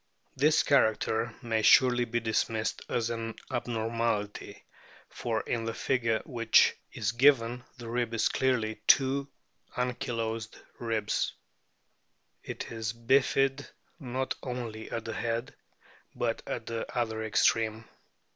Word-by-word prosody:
This 150 +3 +4
character 115 -3 +2
may 115 -2 0
surely 125 +1 +5
be 120 0 -1
dismissed 110 0 -1
as 115 0 0
an 115 -1 -4 0.2
abnormality, 115 -3 -2 0.4
for 115 -2 -2
in 115 -1 -2
the 115 -1 -3
figure 115 -4 0
which 115 -4 +4 0.2
is 105 0 -1
given 125 -1 +3
the 120 -2 -9
rib 120 0 -1
is 115 - +3
clearly 115 -5 0
two 135 +1 +4 0.5
ankylosed 115 -3 -2 0.2
ribs; 110 -3 -1 1.1
it - - -6
is 110 -1 -3
bifid 135 +3 +2 0.3
not 130 -2 -2
only 120 -4 -5
at 115 -1 -4
the 110 - -4
head, 115 +2 -2 0.6
but - - -1
at - - -4
the 115 -1 -4
other 110 -2 -1
extreme. 110 +1 +2
115 Hz, 120 wpm, -29 LUFS, 110-125 Hz, 1.1 s, surely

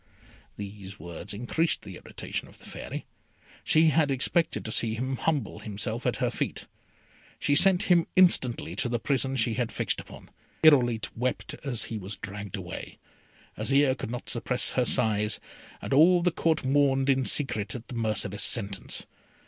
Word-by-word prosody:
These 100 -1 -8
words 85 -2 -8
increased 125 +10 -1
the - - -9
irritation - - -6
of - - -16
the - - -17
Fairy. - - -7 0.6
She 160 0 +4
had 155 -1 +2
expected 140 +5 0
to 110 - -3
see 110 0 +1
him 130 +3 -3
humble 140 -10 -1
himself 110 +3 -3
at - - +1
her - - -1
feet. - - -3 0.7
She 145 - +1
sent 180 +3 +7
him 175 -2 +3
instantly 130 - +3
to 120 - 0
the 120 - 0
prison 135 +2 -1
she 115 -2 +1
had 120 -1 -2
fixed - - -1
upon. - - -14 0.3
Irolite 120 -8 +4
wept 130 +6 -2
as 130 -6 0
he 110 - -5
was 100 +1 -6
dragged 100 -1 -6
away; 90 -1 -8 0.6
Azire 140 -1 +2
could - - -6
not 125 +1 -6
suppress 125 +1 0
her 125 - +1
sighs, 105 -5 +2 0.4
and - - -2
all 170 +5 +6
the 180 - +3
Court 160 -3 0
mourned 135 0 +2
in 135 -1 +3
secret 120 -8 +2 0.2
the - - -9
merciless 110 -3 -1
sentence. 100 -4 0
125 Hz, 165 wpm, -27 LUFS, 105-145 Hz, 0.7 s, sent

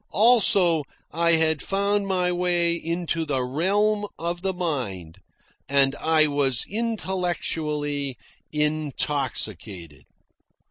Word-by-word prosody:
Also, 195 -8 +5 0.3
I 170 +1 +2
had 160 -1 +2
found 200 +1 0
my 180 -2 0
way 175 -1 +1
into 170 0 -2
the 135 -4 -1
realm 205 +10 +1
of 170 +1 -4
the 190 0 0
mind, 125 - -4 0.5
and 140 0 +3
I 160 -1 +3
was 140 -4 +1
intellectually 165 - -2 0.3
intoxicated. 135 - -2
160 Hz, 95 wpm, -24 LUFS, 140-180 Hz, 0.5 s, Also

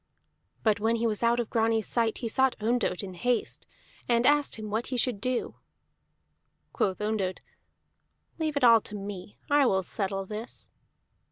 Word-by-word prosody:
But 215 -2 +3
when 225 +2 +2
he 230 0 -1
was 215 -2 -1
out 235 +1 +3
of 235 - -3
Grani's 225 -1 +2
sight, 230 -2 0
he 235 - -3
sought 265 +3 +2
Ondott 220 -4 0
in 190 -2 -6
haste, 245 +6 -1 0.4
and 235 0 +3
asked 290 +1 +3
him 215 -1 -7
what 220 +3 -1
he 255 - -3
should 240 -4 +1
do. 255 +1 -2 1.2
Quoth 190 -2 0
Ondott: 210 -3 -1 1.0
"Leave 310 -2 -1
all 230 -2 +7
to 210 - -7
me. 200 -1 -7
I 285 -2 +4
will 190 -4 +2
settle 195 0 -3
this." 215 +4 -7
225 Hz, 160 wpm, -28 LUFS, 205-245 Hz, 1.2 s, all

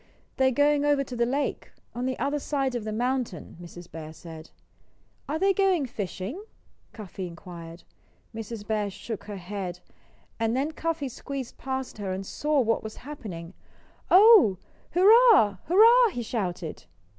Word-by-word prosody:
"They're 265 0 +4
going 290 +3 +2
over 290 -1 +2
to 255 - -8
the 235 0 +1
lake, 280 +3 -2 0.2
on 245 +1 -3
the 260 - -2
other 285 +1 -1
side 275 -2 -1
of 240 -3 -4
the 215 - -3
mountain," 240 - -2
Mrs. 175 0 -11
Bear 160 -1 -8
said. 160 -1 -11 0.8
"Are 305 - 0
they 390 +3 +3
going 375 -6 +2
fishing?" 225 - -5 0.5
Cuffy 195 -3 -7
inquired. 170 -1 -10 0.5
Mrs. 225 -1 -7
Bear 210 -2 -1
shook 215 +2 -7
her 205 -1 -6
head. 180 -1 -6 0.6
And 225 +2 0
then 285 +4 0
Cuffy 320 -2 -2
squeezed 265 0 -7
past 265 -4 -4
her 195 -2 -3
and 190 +1 -5
saw 295 +6 0
what 225 -1 +1
was 220 0 -7
happening. 190 - -8 0.6
"Oh 385 - +7
h, - - -34 0.3
hurrah! 395 - +6
hurrah!" 455 +7 +6
he 245 - -4
shouted. 180 -8 -4
240 Hz, 155 wpm, -26 LUFS, 195-290 Hz, 0.8 s, Oh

